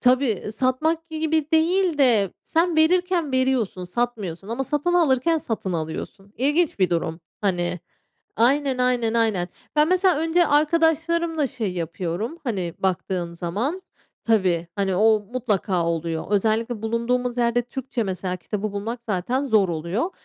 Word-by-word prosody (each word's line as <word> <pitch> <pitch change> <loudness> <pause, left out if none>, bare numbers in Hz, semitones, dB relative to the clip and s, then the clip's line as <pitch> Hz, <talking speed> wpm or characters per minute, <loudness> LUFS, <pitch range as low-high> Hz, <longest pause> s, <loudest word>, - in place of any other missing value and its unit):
tabii 250 -5 +2
satmak 310 +8 0
gibi 315 -1 -1
değil 340 +1 +2
de 225 -9 +4
sen 335 0 +1
verirken 345 -1 +2
veriyorsun, 255 -8 0
satmıyorsun 195 -3 -3
ama 240 +4 -2
satın 295 +5 0
alırken 325 -1 +3
satın 220 -9 -3
alıyorsun. 170 +5 -5
İlginç 295 +5 +1
bir 185 -3 +2
durum. 165 -1 -1 0.2
Hani, 180 -3 -1 0.6
aynen, 265 +3 +2
aynen, 245 -3 +1
aynen. 215 -6 +1 0.3
Ben 300 +1 +4
mesela 370 -3 +3
önce 330 +2 +3
arkadaşlarımla 325 +1 +2
şey 230 -8 -3
yapıyorum, 175 - -4
hani, 190 -9 -2
baktığım 180 -2 -2
zaman 215 - -3 0.4
Tabii, 185 -7 +2
hani 195 -2 0
o 215 +2 +4
mutlaka 205 -7 0
oluyor. 165 -1 -2
Özellikle 220 +2 0
bulunduğumuz 240 +2 -1
yerde 240 0 +2
Türkçe 250 0 -4
mesela 185 -2 -3
kitabı 210 +3 -4
bulmak 225 +4 -4
zaten 225 +7 -1
zor 215 -7 +3
oluyor. 170 - -2
235 Hz, 135 wpm, -23 LUFS, 190-295 Hz, 0.6 s, de